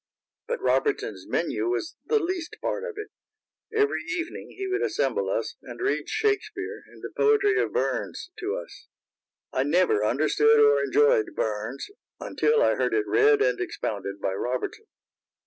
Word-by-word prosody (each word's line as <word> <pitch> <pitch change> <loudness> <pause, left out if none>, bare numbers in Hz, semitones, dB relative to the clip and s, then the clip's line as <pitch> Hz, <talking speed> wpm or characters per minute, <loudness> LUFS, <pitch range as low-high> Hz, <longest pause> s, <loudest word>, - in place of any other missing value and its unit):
But 485 0 -2
Robertson's 425 -2 0
menu - - -1
was 360 -2 -2
the 450 - +3
least 355 -3 -3
part 465 - -2
of 475 -4 -6
it. 425 0 -6 0.6
Every 425 -1 +1
evening 355 -2 -4
he 390 - -3
would 385 +2 -1
assemble 465 - 0
us, - - -2
and - - -10
read 390 +3 -1
Shakespeare 415 0 -1
and - - -17
the - - -6
poetry 425 -1 +3
of - - -1
Burns 370 - -2
to 405 +2 -2
us. - - -9 0.7
I 130 - +1
never 145 - +3
understood 155 - +3
or 440 +1 +5
enjoyed 430 -4 +3
Burns 110 +5 -2 0.3
until 460 +2 +2
I - - +4
heard - - 0
it 420 0 +1
read 430 0 +4
and - - +1
expounded 100 - -4
by 95 - -1
Robertson. 125 - -3
405 Hz, 155 wpm, -26 LUFS, 325-435 Hz, 0.7 s, or